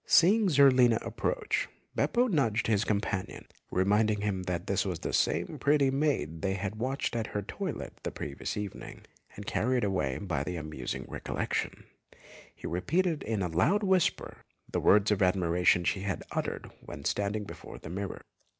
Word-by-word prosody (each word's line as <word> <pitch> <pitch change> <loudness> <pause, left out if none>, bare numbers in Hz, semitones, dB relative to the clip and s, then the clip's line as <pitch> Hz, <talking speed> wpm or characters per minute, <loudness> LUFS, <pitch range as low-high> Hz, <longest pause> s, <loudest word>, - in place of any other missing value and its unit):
Seeing 205 +5 +5
Zerlina 130 -6 +6
approach, - - -1 0.3
Beppo 245 +1 +2
nudged 125 - +1
his 105 -2 +2
companion, 100 -3 -2 0.2
reminding 105 +3 +2
him 100 -3 -1
that 90 -1 -2
this 100 -2 +1
was 90 -4 -2
the - - -3
same - - +1
pretty 140 -2 +3
maid 135 - 0
they 95 -1 0
had 100 +2 -4
watched 130 +1 -1
at 115 -2 -1
her 105 - -3
toilet - - -5
the - - -3
previous 70 - -5
evening, 105 -2 -6 0.3
and 105 - -8
carried 125 +4 +1
away 90 -10 0
by 85 -9 -2
the 90 +4 -4
amusing 75 -6 -5
recollection, - - -3 0.7
he - - -12
repeated 160 - 0
in 110 -3 -1
a - - 0
loud 150 - +2
whisper 190 -2 +1 0.3
the - - -2
words 105 +1 +5
of 100 - +1
admiration 90 -1 +3
she 95 - 0
had 100 -1 -3
uttered - - -3
when - - -9
standing 105 +1 0
before 100 - -9
the 80 - -9
mirror. 100 +1 -5
105 Hz, 160 wpm, -30 LUFS, 90-135 Hz, 0.7 s, Zerlina